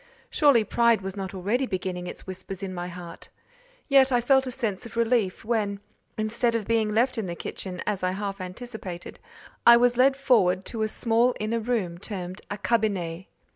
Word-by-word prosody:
Surely 280 -7 +5
pride 235 0 +3
was 190 0 -5
not 195 -1 -5
already 215 +8 0
beginning 180 -2 -3
its - - -8
whispers 190 0 -6
in 190 -1 -4
my 175 0 -4
heart; 175 -1 -10 0.6
yet 270 -1 +5
I 245 - +4
felt 265 +2 +3
a - - -1
sense 225 -7 -2
of 230 - -12
relief 230 -5 +1
when, 210 -3 0 0.4
instead 230 +2 0
of 225 -3 -1
being 220 -1 +1
left 235 +3 +1
in 205 - -3
the 170 - -4
kitchen, 180 +1 -6
as 205 -3 -1
I 185 - +1
half 195 0 -4
anticipated, 185 -2 -7 0.4
I 235 0 +9
was 245 0 +3
led 265 +1 +4
forward 195 -9 +3
to 225 - -4
a 215 - +2
small 235 +3 +1
inner 220 +2 -1
room 215 -7 -2
termed 185 -1 -6
a 205 - -4
"cabinet." 190 -5 -1
215 Hz, 185 wpm, -26 LUFS, 185-235 Hz, 0.6 s, I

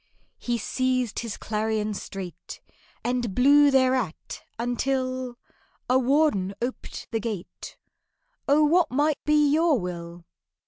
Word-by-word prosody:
He 240 -1 -1
seized 255 0 -1
his 230 -3 -5
clarion 215 0 -2
straight, 190 -2 -8 0.4
And 240 -5 -1
blew 285 +3 +6
thereat, 255 - 0 0.2
until 255 +1 -2 0.5
A 255 +1 +4
warden 255 -8 +2
oped 245 +2 -6
the 225 - 0
gate. 215 -5 -6 0.7
"Oh, 290 +2 +4
what 330 +1 +3
might 295 +3 0
be 300 -1 +4
your 320 -4 +3
will?" 170 -1 -7
250 Hz, 110 wpm, -25 LUFS, 215-275 Hz, 0.7 s, blew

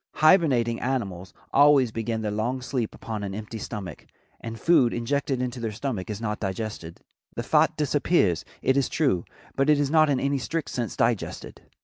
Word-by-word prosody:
Hibernating 140 -9 +4
animals 100 -9 -3 0.2
always 140 -4 +5
begin 115 0 -3
their 105 - -1
long 120 +5 -2
sleep 125 -4 -3
upon 110 -2 -5
an 100 -1 -4
empty 110 +1 -6
stomach, 100 -6 -7 0.3
and 115 -1 -7
food 135 -9 +4
injected 130 +2 -1
into 125 0 -4
their 115 -2 -3
stomach 110 -3 -4
is 105 -1 -4
not 105 -1 -3
digested. 95 -4 -5 0.3
The - - -3
fat - - +3
disappears, 145 - +2 0.2
it 130 - +3
is 140 -1 +1
true, 130 - +1 0.3
but 135 +2 +1
it 150 -1 +5
is 145 -1 0
not 155 -1 +5
in 135 -3 +2
any 140 0 0
strict 160 +3 -3
sense 120 -5 -3
digested. - - -1
120 Hz, 175 wpm, -25 LUFS, 105-140 Hz, 0.3 s, always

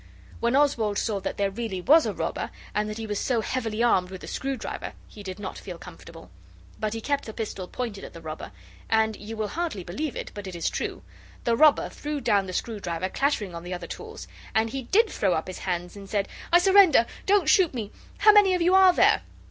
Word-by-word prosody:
When 235 +2 +1
Oswald 235 -8 +2
saw 210 -3 0
that 195 - -4
there 200 -1 +1
really 210 -3 -4
was 310 - +5
a - - -2
robber, - - -3 0.2
and 210 0 0
that 215 - -5
he 225 - -4
was 210 -2 -2
so 240 -4 +1
heavily 225 -1 -2
armed 185 -6 +3
with 185 -1 -8
the - - -9
screwdriver, 270 -1 -4
he 210 - -12
did 190 -2 -6
not 200 -2 -6
feel 180 -3 -8
comfortable. 165 -1 -12 0.5
But 215 0 -2
he 225 - -4
kept 285 +3 -1
the 220 - -7
pistol 210 -5 -5
pointed 225 -4 -5
at - - -9
the 165 - -9
robber, 155 -1 -7 0.4
and 220 -1 +2
you 215 +2 -8
will 215 -1 -2
hardly 320 - -3
believe 260 - -4
it, - - -6
but 205 -1 -7
it 185 - -7
is 170 - -1
true - - -4 0.4
the 235 - +2
robber 305 +4 +5
threw 295 0 -5
down 205 -6 +2
the 185 - -6
screwdriver 185 -5 -3
clattering 225 -9 0
on 170 - -6
the 180 +1 -5
other 175 -1 -7
tools, 445 - -8 0.3
and 220 0 +2
he 270 - -3
did 420 - +3
throw 195 - 0
up 160 - -2
his 185 - -7
hands, 180 0 -3
and 200 -1 -10
said 200 -2 0 0.2
'I 345 - +8
surrender; 380 - +6 0.2
don't 395 -5 +4
shoot 350 +1 +5
me! 215 -4 -4 0.3
How 425 - +7
many 400 -3 +6
of 360 - -1
you 360 +2 +4
are 380 -1 +7
there? - - +4
220 Hz, 230 wpm, -26 LUFS, 190-285 Hz, 0.5 s, I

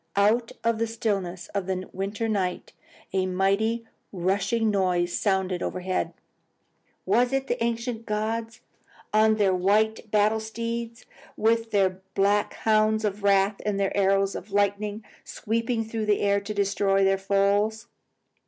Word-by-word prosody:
Out 220 +4 +2
of 230 -1 +1
the 230 - +1
stillness 195 -6 -3
of 200 -2 -3
the 185 -1 -3
winter 205 +4 -3
night, 190 -4 -2 0.4
a 190 -1 +1
mighty 200 +5 +1 0.3
rushing 200 +4 0
noise 180 -3 +1
sounded 190 -3 0
overhead. 185 0 -2 0.9
Was 245 +1 +3
it 270 0 0
the 240 -2 -2
ancient 230 0 -3
gods 220 +2 -3 0.5
on 215 0 +5
their 200 -3 +2
white 215 +4 +1
battle 215 +1 +3
steeds, 230 +1 -5 0.3
with 225 +1 +2
their 190 -3 +1
black 205 +1 +2
hounds 215 0 +2
of 205 0 -2
wrath 200 0 +2
and 205 -1 -1
their 195 -1 0
arrows 195 0 +2
of 195 +3 -8
lightning, 205 +1 0 0.2
sweeping 230 +1 -2
through 220 -1 -4
the 210 - +2
air 200 0 +2
to 200 +1 -6
destroy 200 -1 +1
their 195 0 +3
foes? 200 +3 +1
205 Hz, 140 wpm, -26 LUFS, 195-225 Hz, 0.9 s, on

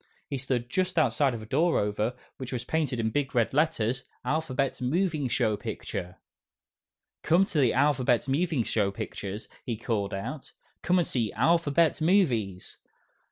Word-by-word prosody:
He 140 - -3
stood 125 -2 -1
just 185 +6 -1
outside 145 -4 +3
of 110 - -7
a - - -8
door 160 +9 +2
over 105 +3 0 0.2
which 130 -2 -6
was 125 -3 -3
printed 150 -6 -1
in 110 -1 0
big 140 +1 -1
red 120 0 +2
letters, 130 -5 +1 0.2
"ALPHABET 140 -2 -1
MOVING 155 0 0
PICTURE 110 -4 -1
SHOW" 90 +1 -5 1.1
"Come 180 +4 +4
to 180 -6 -1
the 125 -5 +4
'Alphabet 130 -2 +2
Moving 150 -1 +1
Pictures,'" 100 0 -3 0.2
he 115 -3 -3
called 105 -4 -2
out. 130 +9 -6 0.3
"Come 180 +1 +2
and 175 - +2
see 115 -5 -1
'Alphabet 165 +5 +2
Movies'!" 125 - +1
130 Hz, 150 wpm, -28 LUFS, 115-155 Hz, 1.1 s, Come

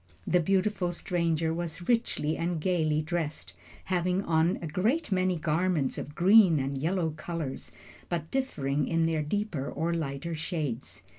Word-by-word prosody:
The 180 - +3
beautiful 190 +1 +1
stranger 170 -2 0
was 170 +1 -4
richly 230 -10 +1
and 170 0 -1
gaily 155 -3 +1
dressed, 155 - -3 0.3
having 180 +1 0
on 165 +2 +2
a - - -6
great 215 - 0
many 185 -1 +2
garments 160 -2 0
of 145 - -7
green 190 -1 +6
and 135 +1 -2
yellow 165 +4 0
colors, 155 -2 -5 0.4
but 165 -2 -3
differing 145 - -1
in 165 0 +2
their 160 -1 +1
deeper 150 -3 -2
or 165 +3 -1
lighter 155 0 -3
shades. 155 -6 -4
165 Hz, 145 wpm, -29 LUFS, 155-180 Hz, 0.4 s, green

